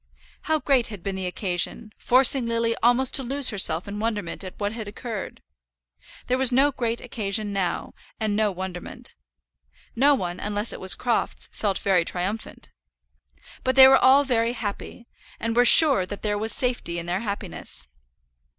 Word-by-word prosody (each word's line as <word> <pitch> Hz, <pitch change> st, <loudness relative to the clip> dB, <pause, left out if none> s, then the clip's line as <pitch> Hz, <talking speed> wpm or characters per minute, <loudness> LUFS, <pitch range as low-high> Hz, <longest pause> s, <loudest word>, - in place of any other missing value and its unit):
How 315 Hz, -, +3 dB
great 270 Hz, -5 st, +1 dB
had 205 Hz, -6 st, -10 dB
been 195 Hz, -1 st, -3 dB
the 190 Hz, -1 st, -4 dB
occasion, 185 Hz, +4 st, -3 dB
forcing 255 Hz, 0 st, +4 dB
Lily 230 Hz, 0 st, -1 dB
almost 245 Hz, +2 st, +2 dB
to -, -, +6 dB
lose 270 Hz, +1 st, +3 dB
herself 180 Hz, -4 st, 0 dB
in 205 Hz, +1 st, -6 dB
wonderment 210 Hz, -6 st, -3 dB
at 185 Hz, -, -10 dB
what 205 Hz, 0 st, -2 dB
had 220 Hz, -2 st, -7 dB
occurred! 215 Hz, 0 st, -7 dB, 0.8 s
There 255 Hz, +1 st, -1 dB
was 260 Hz, -1 st, +3 dB
no 275 Hz, +3 st, +3 dB
great 235 Hz, -3 st, -3 dB
occasion 205 Hz, -1 st, -3 dB
now, 190 Hz, -3 st, -3 dB, 0.3 s
and 215 Hz, -2 st, -1 dB
no 215 Hz, -1 st, +1 dB
wonderment. 185 Hz, -1 st, -7 dB, 0.8 s
No 280 Hz, +4 st, +4 dB
one, 180 Hz, -7 st, -5 dB
unless 210 Hz, +2 st, -1 dB
it -, -, -8 dB
was 190 Hz, 0 st, +4 dB
Crofts, 240 Hz, -2 st, -2 dB
felt 200 Hz, -3 st, -2 dB
very 190 Hz, -3 st, +1 dB
triumphant. 185 Hz, +6 st, -6 dB, 0.9 s
But 260 Hz, 0 st, 0 dB
they 265 Hz, -1 st, +9 dB
were 265 Hz, -, +6 dB
all 270 Hz, +2 st, +6 dB
very 235 Hz, -3 st, 0 dB
happy, 230 Hz, +1 st, -7 dB, 0.3 s
and 230 Hz, 0 st, -3 dB
were 245 Hz, +1 st, +4 dB
sure 270 Hz, -, +7 dB
that 205 Hz, -, -8 dB
there 210 Hz, -1 st, -1 dB
was 220 Hz, +2 st, -1 dB
safety 245 Hz, -9 st, 0 dB
in 170 Hz, -, -5 dB
their 175 Hz, +2 st, -2 dB
happiness. 205 Hz, -2 st, -5 dB
220 Hz, 170 wpm, -23 LUFS, 195-250 Hz, 0.9 s, they